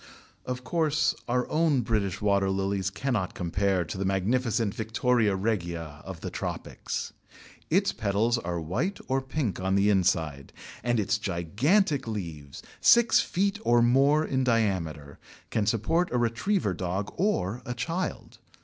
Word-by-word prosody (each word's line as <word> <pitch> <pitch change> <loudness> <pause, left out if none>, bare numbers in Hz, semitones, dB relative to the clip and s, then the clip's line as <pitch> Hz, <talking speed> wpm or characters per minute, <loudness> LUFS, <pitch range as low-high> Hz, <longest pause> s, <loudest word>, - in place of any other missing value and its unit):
Of 125 0 -4
course, 155 +1 +1
our 125 0 0
own 155 -4 +2
British 105 -5 -1
water 100 -2 +2
lilies 95 0 -1
cannot 105 -3 -2
compare 95 +2 0
with 80 - -9
the 95 - -3
magnificent 110 +3 0
Victoria 110 -1 +1
regia 85 -7 -3
of - - -8
the - - -5
tropics. - - -5 0.6
Its 195 +4 +3
petals 110 +3 +1
are 85 -5 -3
white 120 - -2
or 135 0 +1
pink 130 -6 -2
on 95 +1 0
the 100 +1 +4
inside, 80 -7 0 0.3
and 120 -1 +1
its 105 0 0
gigantic 115 - +1
leaves, 80 -10 -6 0.2
six 235 -1 +6
feet 200 +3 0
or 120 0 +4
more 140 +6 +4
in 130 -3 0
diameter, 95 - -1 0.3
can 105 -2 0
support 140 - +1
a 125 - +1
retriever 120 - 0
dog 95 +3 -3
or 125 - 0
a 120 - -5
child. 170 +9 -4
110 Hz, 140 wpm, -27 LUFS, 95-130 Hz, 0.6 s, six